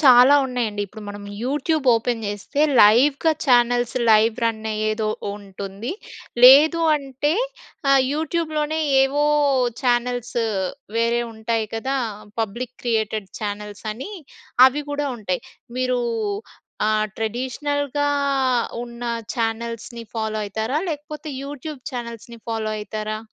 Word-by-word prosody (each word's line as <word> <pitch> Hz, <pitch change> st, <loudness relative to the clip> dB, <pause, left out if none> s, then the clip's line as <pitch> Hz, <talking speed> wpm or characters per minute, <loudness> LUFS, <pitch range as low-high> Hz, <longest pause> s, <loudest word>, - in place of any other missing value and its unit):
చాలా 260 Hz, -1 st, +8 dB
ఉన్నాయండి. 230 Hz, -5 st, -2 dB
ఇప్పుడు 215 Hz, +3 st, -11 dB
మనం 205 Hz, 0 st, -7 dB, 0.2 s
యూట్యూబ్ 295 Hz, +3 st, 0 dB
ఓపెన్ 230 Hz, 0 st, -1 dB
చేస్తే, 205 Hz, +8 st, -3 dB, 0.2 s
లైవ్‌గా 270 Hz, +9 st, +5 dB
ఛానల్స్, 245 Hz, -1 st, +3 dB
లైవ్ 220 Hz, +1 st, +5 dB
రన్ 220 Hz, -1 st, -1 dB
అయ్యేదో 215 Hz, 0 st, -1 dB, 0.3 s
ఉంటుంది. 200 Hz, -, -6 dB, 0.5 s
లేదు 300 Hz, +6 st, +8 dB, 0.2 s
అంటే, 275 Hz, +1 st, -2 dB, 0.6 s
ఆహ్, 275 Hz, -1 st, +6 dB
యూట్యూబ్‍లోనే 315 Hz, -1 st, -1 dB, 0.2 s
ఏవో, 285 Hz, +2 st, +1 dB, 0.6 s
ఛానల్సు, 245 Hz, -1 st, 0 dB, 0.5 s
వేరే 230 Hz, +1 st, +2 dB
ఉంటాయి 220 Hz, 0 st, -1 dB
కదా! 265 Hz, +5 st, -1 dB, 0.4 s
పబ్లిక్ 235 Hz, +3 st, -3 dB
క్రియేటెడ్ 220 Hz, -4 st, -1 dB
ఛానల్సని, 210 Hz, -, -5 dB, 0.5 s
అవి 280 Hz, +3 st, 0 dB
కూడా 290 Hz, 0 st, -1 dB
ఉంటాయి. 185 Hz, -5 st, -3 dB, 0.4 s
మీరు, 255 Hz, -1 st, +1 dB, 0.9 s
ఆహ్, 215 Hz, 0 st, +2 dB
ట్రెడిషనల్‍గా 285 Hz, +5 st, -1 dB, 0.8 s
ఉన్న 235 Hz, 0 st, -10 dB, 0.3 s
ఛానల్స్‌ని 230 Hz, +1 st, -3 dB
ఫాలో 220 Hz, -1 st, -1 dB
అయితారా? 220 Hz, +7 st, -1 dB
లేకపోతే 300 Hz, +1 st, -6 dB, 0.2 s
యూట్యూబ్ 290 Hz, 0 st, -7 dB
ఛానల్స్‌ని 235 Hz, -1 st, -7 dB
ఫాలో 220 Hz, -1 st, -2 dB
అయితారా? 215 Hz, 0 st, -4 dB
235 Hz, 105 wpm, -22 LUFS, 220-275 Hz, 0.9 s, చాలా